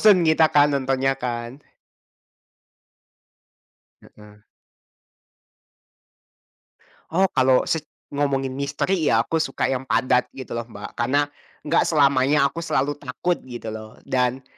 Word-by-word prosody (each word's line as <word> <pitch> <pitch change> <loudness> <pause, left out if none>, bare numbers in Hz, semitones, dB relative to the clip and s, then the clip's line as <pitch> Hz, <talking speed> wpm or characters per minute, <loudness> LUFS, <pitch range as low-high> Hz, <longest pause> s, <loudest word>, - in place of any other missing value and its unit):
bosan 195 -5 +6
kita 160 0 +5
kan 145 0 +4
nontonnya 135 0 +1
kan. 120 +3 -5 2.5
Heeh. 105 0 -17 2.7
Oh 190 +4 +3
kalau 130 -1 +3
sec 160 - 0 0.3
ngomongin 135 -2 -1
misteri 145 +5 -1
ya 115 +1 +3
aku 165 - -1
suka 140 -4 -2
yang 130 0 -4
padat 125 +3 +2
gitu 130 - -8
loh 115 0 -4
Mbak, 105 -3 -9
karena 130 +5 +1 0.4
enggak 160 +3 +2
selamanya 140 -1 +3
aku 165 +4 -4
selalu 145 -3 0
takut 145 +6 -2
gitu 115 -3 -6
loh 110 0 -9
dan 125 0 0
135 Hz, 115 wpm, -23 LUFS, 125-150 Hz, 2.7 s, bosan